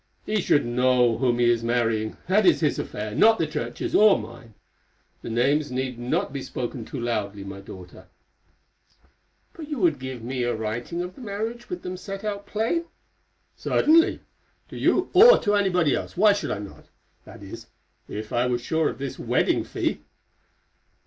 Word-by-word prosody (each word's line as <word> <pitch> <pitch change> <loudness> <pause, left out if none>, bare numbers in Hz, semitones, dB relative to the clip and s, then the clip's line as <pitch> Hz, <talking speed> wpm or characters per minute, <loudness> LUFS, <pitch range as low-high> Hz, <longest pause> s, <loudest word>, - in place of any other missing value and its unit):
"He 215 -1 0
should 145 - +2
know 125 -1 +2
whom 125 -3 +2
he 120 -1 +3
is 120 -1 +2
marrying; 115 -2 0
that 200 +4 +3
is 185 - +4
his 150 - +1
affair, 105 0 -5
not 225 - +5
the 165 - 0
Church's 155 0 -4
or 210 -1 +6
mine. 115 0 -11 0.7
The - - -7
names 140 +5 +1
need 130 -1 -3
not 120 +2 -1
be 140 - -4
spoken 120 -2 -5
too 135 - -6
loudly, 105 -4 -3
my 100 0 -8
daughter." 90 -2 -12 1.5
"But 315 -2 -9
you 295 - -3
would 170 - +2
give 130 -3 -7
me 125 +2 -3
a 120 0 0
writing 115 +10 -4
of 180 +1 -7
the 260 - -14
marriage 225 +2 -5
with 360 - -6
them 185 0 -5
set 195 +2 -7
out 205 -1 -4
plain?" 230 +11 -1 0.7
"Certainly. 325 +2 +3 0.5
To - - -10
you 370 - +1
or 460 +7 +9
to 205 - 0
anybody 180 -7 +2
else; - - -4
why 210 +2 +6
should 205 - -3
I - - -2
not?—that 100 -1 -14
is, - - -10 0.4
if 110 +1 -6
I 120 +1 +2
were 125 -1 +1
sure 160 +6 0
of - - -7
this 135 -1 -6
wedding - - +1
fee." - - -3
130 Hz, 175 wpm, -24 LUFS, -, 1.5 s, or